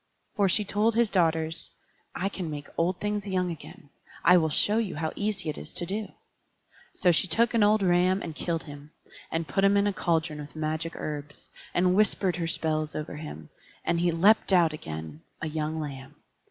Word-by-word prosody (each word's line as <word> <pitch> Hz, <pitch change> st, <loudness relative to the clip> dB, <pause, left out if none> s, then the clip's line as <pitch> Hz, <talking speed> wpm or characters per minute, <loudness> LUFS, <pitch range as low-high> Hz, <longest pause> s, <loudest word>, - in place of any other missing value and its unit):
For 200 Hz, -2 st, +3 dB
she 210 Hz, +3 st, +2 dB
told 210 Hz, +3 st, +1 dB
his 235 Hz, -2 st, +3 dB
daughters: 165 Hz, -2 st, +1 dB, 0.5 s
"I 190 Hz, -, -1 dB
can 185 Hz, -4 st, -4 dB
make 145 Hz, -1 st, -5 dB
old 175 Hz, +2 st, 0 dB
things 210 Hz, -1 st, -2 dB
young 185 Hz, -2 st, 0 dB
again; 145 Hz, -2 st, -11 dB, 0.3 s
I 180 Hz, -, +8 dB
will 160 Hz, -3 st, +3 dB
show 205 Hz, +8 st, +3 dB
you 215 Hz, -5 st, -2 dB
how 155 Hz, +1 st, -2 dB
easy 205 Hz, -4 st, -2 dB
it 155 Hz, -, -2 dB
is -, -, -9 dB
to 175 Hz, -, +1 dB
do." 205 Hz, +4 st, -4 dB, 0.8 s
So 180 Hz, -, +3 dB
she 170 Hz, +3 st, +2 dB
took 230 Hz, +8 st, +2 dB
an 230 Hz, -, +3 dB
old 210 Hz, 0 st, +4 dB
ram 180 Hz, +1 st, +3 dB
and 165 Hz, -, -5 dB
killed 165 Hz, +1 st, -2 dB
him, 145 Hz, 0 st, -11 dB, 0.4 s
and 165 Hz, 0 st, -1 dB
put 160 Hz, +8 st, 0 dB
him 200 Hz, +1 st, +5 dB
in 200 Hz, -, +3 dB
a 205 Hz, -, +1 dB
cauldron 165 Hz, -4 st, 0 dB
with 145 Hz, +1 st, -9 dB
magic 155 Hz, +2 st, -2 dB
herbs; 150 Hz, -1 st, -6 dB, 0.2 s
and 180 Hz, +1 st, +3 dB
whispered 195 Hz, -3 st, +2 dB
her 165 Hz, -2 st, -2 dB
spells 155 Hz, -2 st, -1 dB
over 150 Hz, -1 st, -5 dB
him, 80 Hz, -, -8 dB, 0.4 s
and 170 Hz, 0 st, +1 dB
he 175 Hz, 0 st, +2 dB
leapt 195 Hz, +6 st, +4 dB
out 170 Hz, -4 st, +5 dB
again 80 Hz, -, -7 dB, 0.2 s
a 160 Hz, -, -3 dB
young 155 Hz, 0 st, -2 dB
lamb. 135 Hz, -3 st, -7 dB
170 Hz, 195 wpm, -27 LUFS, 155-195 Hz, 0.8 s, I